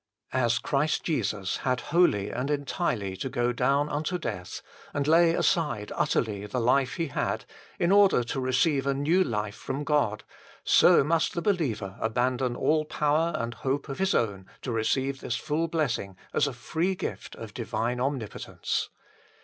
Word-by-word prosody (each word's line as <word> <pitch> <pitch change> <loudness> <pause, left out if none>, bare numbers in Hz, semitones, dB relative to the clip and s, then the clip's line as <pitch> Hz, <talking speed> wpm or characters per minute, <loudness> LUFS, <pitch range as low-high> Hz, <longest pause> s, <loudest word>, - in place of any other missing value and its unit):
As 120 -2 +2
Christ 140 +5 0
Jesus 105 - -1
had 130 -1 0
wholly 105 - +3
and 135 +3 -3
entirely 140 - -1
to 130 - -3
go 120 0 0
down 140 +4 +2
unto 150 +5 -2
death, 90 - -5 0.3
and 145 0 0
lay 165 +1 +5
aside 150 -11 0
utterly 105 -3 0
the 125 - -2
life 130 +2 +2
He 165 -4 -2
had, - - -2 0.3
in 175 - +2
order 200 -10 +5
to 120 +3 -3
receive 135 +2 +1
a 140 - +2
new 160 +7 +3
life 105 - -2
from 135 +6 -4
God, 140 -9 +1 0.4
so - - +6
must 165 +3 +1
the 170 - -1
believer 125 - -1
abandon 125 +2 0
all 155 +3 +2
power 155 +2 +1
and 115 +1 -2
hope 140 +4 -2
of 135 - -5
his 190 0 +2
own 100 -4 -1 0.2
to 130 - -3
receive 130 +4 0
this 120 - -2
full 155 +5 -1
blessing 125 - -2 0.2
as - - +3
a 140 - -3
free 165 +10 -1
gift - - -5
of 110 -2 -9
divine 120 0 -2
Omnipotence. 130 -5 -2
135 Hz, 165 wpm, -27 LUFS, 115-155 Hz, 0.4 s, so